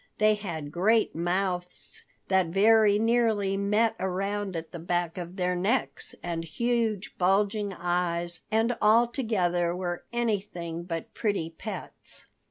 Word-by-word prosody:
They 215 0 +5
had 170 -8 -5
great 215 +7 +3
mouths 180 +1 -2 0.3
that 190 -2 +3
very 205 +3 +5
nearly 220 -3 +2
met 210 +3 +2
around 195 +1 -2
at 165 0 -5
the 175 - -7
back 175 0 -1
of 175 +1 -7
their 180 -1 0
necks, 205 +9 -1
and 170 -1 -2
huge, 225 +4 -1
bulging 200 +3 +2
eyes, 175 -1 -1
and 225 +2 +2
altogether 210 -7 +2
were 175 -1 -3
anything 195 -8 -2
but 165 -2 -5
pretty 200 -7 -1
pets. 165 - -7
190 Hz, 125 wpm, -28 LUFS, 175-215 Hz, 0.3 s, They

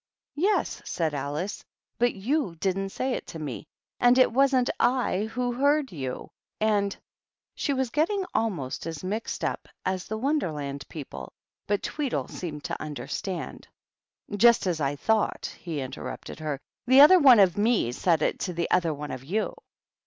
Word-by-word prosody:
"Yes," 405 +5 +1
said 160 -3 -1
Alice, 145 +8 -3 0.4
"but 240 0 +2
you 215 - -1
didn't 195 +3 -1
say 255 +6 -2
it - - -4
to - - -7
mej 145 -2 -5 0.3
and 245 +1 +5
it 255 - +5
wasn't 260 -1 +3
/ - - -39 0.5
who 245 +1 -1
heard 285 +3 +2
you, 130 -6 -5 0.3
and 205 -2 +1 0.3
" - - -67 0.2
She 285 - -1
was 265 -3 0
getting 370 - +1
almost 170 - -2
as 165 -1 -6
mixed 210 +5 -3
up - - -2 0.2
as 185 -1 -2
the 220 - -3
Won 285 +7 +1
derland 140 - -5
people, 100 - -8 0.4
but 205 0 0
Tweedle 290 -4 -2
seemed 150 -5 -6
to - - -4
under 145 -5 -6
stand. 180 +6 -5 0.4
" 205 - -11
Just 235 +1 +6
as 170 -4 -1
I 140 0 0
thought," 220 +8 0
he 160 -5 -4
interrupted 130 +4 -7
her. 150 -3 -3
" - - -67
The 260 +2 +8
other 365 +6 +9
one 260 -7 +8
of 190 -3 +5
me 210 - +2
said 160 +4 +1
it - - 0
to 180 - -3
the 170 0 -2
other 170 -4 +2
one 145 +1 -6
of 130 - -6
you. 205 +10 -1
195 Hz, 175 wpm, -27 LUFS, 155-245 Hz, 0.5 s, other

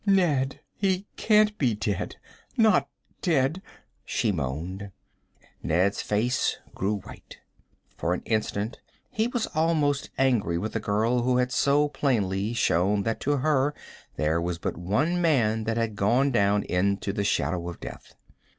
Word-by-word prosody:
"Ned, 170 -10 +2
he 190 -1 0
can't 210 -1 +3
be 125 -6 +2
dead 105 -2 -2 0.4
not 220 -2 +4 0.3
dead!" 160 0 +1 0.4
she 110 - 0
moaned. 85 +6 -4 0.7
Ned's 90 +5 +1
face 115 +5 0 0.2
grew 100 +1 -1
white. - - -12 0.6
For 90 +2 0
an - - -7
instant 110 0 -1 0.3
he 220 +1 +1
was 245 -2 -1
almost 155 -3 +1
angry 120 -11 +2
with 105 +6 -3
the 115 - 0
girl 110 +4 +1
who 125 +1 +2
had 125 0 +1
so 145 +2 +3
plainly 110 -8 0
shown 100 -1 +2
that 115 +1 -1
to 145 +1 +1
her 145 +1 +1 0.4
there 80 +2 +1
was 85 0 -2
but - - -3
one 135 - 0
man 115 -9 +2
that 115 0 -1
had 115 -2 -1
gone 120 +8 +2
down 100 -3 +2
into 100 +2 0
the 100 - -1
shadow 90 -3 0
of 85 - -9
death. - - -10
115 Hz, 145 wpm, -26 LUFS, 100-145 Hz, 0.7 s, not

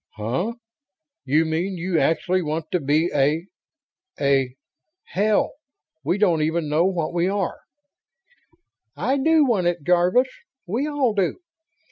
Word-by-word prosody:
"Huh? 125 - -2 0.7
You 150 +4 +3
mean 170 +4 -2
you 170 -1 0
actually 180 +3 +1
want 155 0 -4
to 180 - +1
be 155 +4 +1
a... 150 +4 +2 0.7
a... 135 -2 +1 0.5
hell, 210 +2 +1 0.5
we 170 +7 0
don't 180 -6 +3
even 160 +1 0
know 155 +4 +2
what 175 -5 -1
we 175 +1 +1
are!" 195 -2 -2 1.4
"I 245 - +1
do 315 +2 +4
want 205 -9 +1
it, 175 -3 -1
Jarvis. 180 - +3 0.4
We 235 +11 -1
all 285 -6 +1
do." 195 -3 0
175 Hz, 130 wpm, -23 LUFS, 155-200 Hz, 1.4 s, do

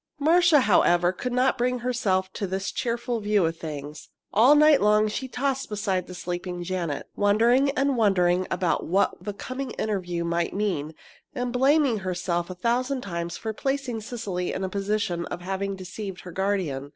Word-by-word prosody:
Marcia, 325 0 +5
however, 175 -5 +4
could 250 +7 -4
not 250 +1 +2
bring 250 +1 +1
herself 205 -7 -1
to 200 - -3
this 190 +2 -3
cheerful 235 0 -2
view 205 -3 +2
of 165 +1 -1
things. 150 -2 -7 0.2
All 245 +8 +6
night 300 -1 +6
long 210 +1 +4
she 260 +5 -3
tossed 270 +1 -2
beside 195 -4 -1
the 180 - -9
sleeping 175 0 -4
Janet, 175 -5 -3
wondering 230 +7 +3
and 275 0 +2
wondering 185 -5 +2
about 180 -3 0
what 195 +4 +2
the 205 - -3
coming 255 +6 -5
interview 180 -5 -2
might 170 +1 -1
mean, 170 -7 -2 0.4
and 245 -1 -2
blaming 270 -2 +3
herself 175 -2 -2
a 185 - -6
thousand 250 +7 0
times 170 -4 -4
for 220 -1 -4
placing 265 -2 -2
Cecily 205 -6 -4
in 190 - -3
the 190 - -2
position 200 -3 -1
of 175 - -6
having 195 +2 -3
deceived 190 +1 -7
her 180 - -9
guardian. 180 -8 -2
200 Hz, 170 wpm, -25 LUFS, 180-245 Hz, 0.4 s, All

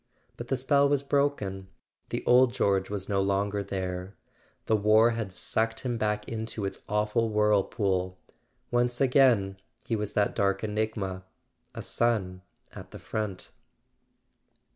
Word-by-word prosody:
But - - -8
the 135 - 0
spell 140 +2 +3
was 140 -1 +1
broken: 140 -10 -1 0.4
the - - -4
old 125 0 +5
George 95 -1 +1
was 100 -2 -4
no 100 -2 +1
longer 100 +1 0
there. 95 -1 -4 0.5
The 110 - +2
war 110 +2 +5
had 115 -4 -3
sucked 115 +4 -1
him 120 -3 -2
back 105 0 -1
into 110 -2 -4
its 95 - -5
awful 105 +2 +1
whirlpool—once 105 +3 -1
more 125 -7 +4 0.3
he 115 - -1
was 105 -1 -3
that 105 -1 +1
dark 100 +1 0
enigma, 105 -3 -2 0.5
a - - -5
son 100 -6 0 0.3
at - - -10
the - - -10
front. 105 -4 -4
105 Hz, 135 wpm, -28 LUFS, 95-115 Hz, 0.5 s, old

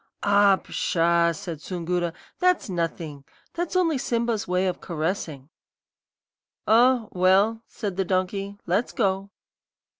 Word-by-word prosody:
"'Ah, 200 -1 +5
pshaw!' 170 -2 +1
said 165 -1 -7
Soongoora; 175 -1 -2 0.3
'that's 360 - +2
nothing. 165 -4 -3 0.3
That's 345 +1 -3
only 330 -6 +2
Simba's 235 -3 -1
way 180 +1 +1
of 185 - -2
caressing.' 160 -4 -3 1.2
"'Oh, 235 0 +4
well,' 195 +5 +3
said 200 -5 -5
the 195 - +1
donkey, 195 +2 -2
'let's 195 +7 0
go.' 195 -2 0
190 Hz, 115 wpm, -25 LUFS, 170-220 Hz, 1.2 s, Ah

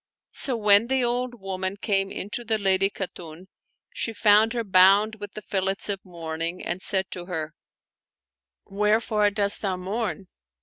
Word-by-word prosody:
So 255 -4 -1
when 210 +1 +5
the 265 0 +1
old 245 0 -2
woman 190 0 -4
came 195 -2 0
into 210 +6 -5
the 220 -1 0
Lady 195 -1 +2
Khatun, 180 -3 -8 0.5
she 230 - -3
foimd 215 +1 +4
her 235 -1 -2
bound 200 +2 +4
with 205 -1 -8
the 215 - -7
fillets 195 +1 -1
of 195 -1 -2
mourning, 165 0 -5
and 175 +2 -3
said 190 -1 0
to 175 -1 -6
her, 160 -3 -4 0.6
" - - -68
Where 210 +2 +1
fore 210 -2 +1
dost 200 0 0
thou 190 -3 -1
mourn?" 200 +2 -3
200 Hz, 165 wpm, -25 LUFS, 185-215 Hz, 0.6 s, when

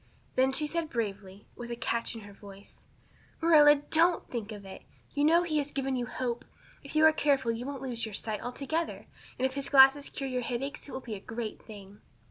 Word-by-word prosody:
Then 260 +1 +3
she 275 +3 +2
said 325 +1 -2
bravely, 200 -4 -4
but - - -25
with 240 0 -6
a 235 - -3
catch 235 0 -1
in 225 - -8
her 205 -1 -12
voice: 200 0 -13 0.6
"Marilla, 300 -3 +7
don't 325 +4 +2
think 225 -3 -4
of 205 -2 -9
it. 190 - -10 0.3
You 290 - 0
know 335 +3 +5
he 310 -3 0
has 285 0 -2
given 270 -1 -2
you 245 -1 -2
hope. 245 -1 -3 0.4
If 280 - -9
you 310 0 +6
are 315 - +7
careful 275 -6 +2
you 235 +3 -5
won't 275 -2 -6
lose 240 -3 -4
your 220 -3 -4
sight 215 0 -3
altogether; 280 +7 -3 0.3
and 255 - 0
if 265 - 0
his 275 0 -3
glasses 270 +1 +6
cure 275 - -5
your 255 -1 -2
headaches 270 +5 -4
it - - -9
will 260 - -5
be 235 -4 -7
a 205 - -5
great 225 +2 -6
thing." 205 -2 -13
260 Hz, 225 wpm, -29 LUFS, 225-290 Hz, 0.6 s, Marilla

